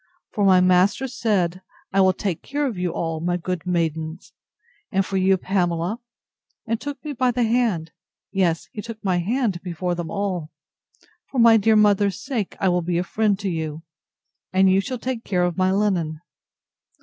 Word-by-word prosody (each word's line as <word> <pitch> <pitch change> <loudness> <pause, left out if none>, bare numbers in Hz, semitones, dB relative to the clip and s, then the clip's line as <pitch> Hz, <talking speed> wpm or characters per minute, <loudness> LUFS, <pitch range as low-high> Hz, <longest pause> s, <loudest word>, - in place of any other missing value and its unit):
For 205 - -1
my 185 -2 +6
master 185 +8 +3
said, 195 -7 0 0.3
I 195 - +4
will 190 0 +5
take 185 -2 -3
care 290 +1 -2
of 250 -6 -2
you 180 0 -1
all, 165 -1 -3
my 175 +2 0
good 180 0 -4
maidens; 160 -2 -2 0.6
and 195 0 +1
for 195 - -5
you, 190 0 +3
Pamela, 180 +2 -1 0.7
(and 225 0 -2
took 290 +1 -6
me 295 - -3
by 255 -1 +1
the 245 0 +1
hand; 220 -9 +1 0.4
yes, 180 -4 0
he 210 - -6
took 230 0 -7
my 180 -2 +2
hand 210 -1 -1
before 180 0 -3
them 170 -2 -4
all,) 185 -6 -2 0.8
for 270 - -6
my 230 -1 +7
dear 220 0 +4
mother's 205 -2 +3
sake, 235 -8 -3
I 195 - +1
will 180 -1 +2
be 170 0 -1
a 175 - +1
friend 210 +2 +1
to 200 - -1
you, 160 -1 -4 0.7
and 190 0 +4
you 190 +1 +4
shall 255 +5 -4
take 245 -1 -4
care 180 -3 0
of 175 -1 0
my 185 +1 +2
linen. 185 -6 0
190 Hz, 185 wpm, -23 LUFS, 175-220 Hz, 0.8 s, my